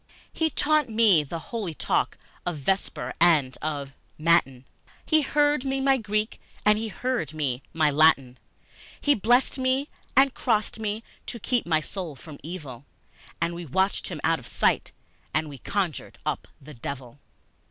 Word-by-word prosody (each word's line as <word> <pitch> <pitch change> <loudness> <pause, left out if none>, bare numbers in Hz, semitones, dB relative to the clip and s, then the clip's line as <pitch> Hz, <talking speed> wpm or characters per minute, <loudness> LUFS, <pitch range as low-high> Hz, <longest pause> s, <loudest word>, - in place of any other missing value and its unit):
He 320 -1 +1
taught 305 -3 +2
me 215 -8 +5
the 150 +4 -5 0.2
holy 200 -9 -3
talk - - 0 0.3
of 175 -3 -2
Vesper 190 +8 -1
and 150 -7 +4
of 145 -3 -3 0.2
Matin, 155 -6 +2 0.4
He 310 -1 +4
heard 290 -1 +2
me 270 0 -1
my 270 0 +4
Greek 215 -1 -2 0.2
and 210 0 +5
he 225 - -2
heard 235 - -2
me 135 -4 -1
my 155 -2 +3
Latin, 140 -4 +4 0.6
He 290 - +4
blessed 245 +4 +3
me 260 +2 +1 0.3
and 270 0 +6
crossed 220 -2 0
me 215 +1 -2 0.2
to 240 - -4
keep 240 -2 0
my 155 -2 +3
soul 170 -2 -6
from 145 +1 -11
evil, 145 -6 -7 0.6
And 170 +1 0
we 175 +1 -6
watched 190 +8 +1
him - - -5
out - - +2
of - - -12
sight, - - +1 0.4
and 155 0 +1
we 140 -3 -9
conjured 190 -2 -2
up - - -2
the 150 +2 -12
devil! 130 +1 -7
180 Hz, 160 wpm, -26 LUFS, 150-240 Hz, 0.6 s, and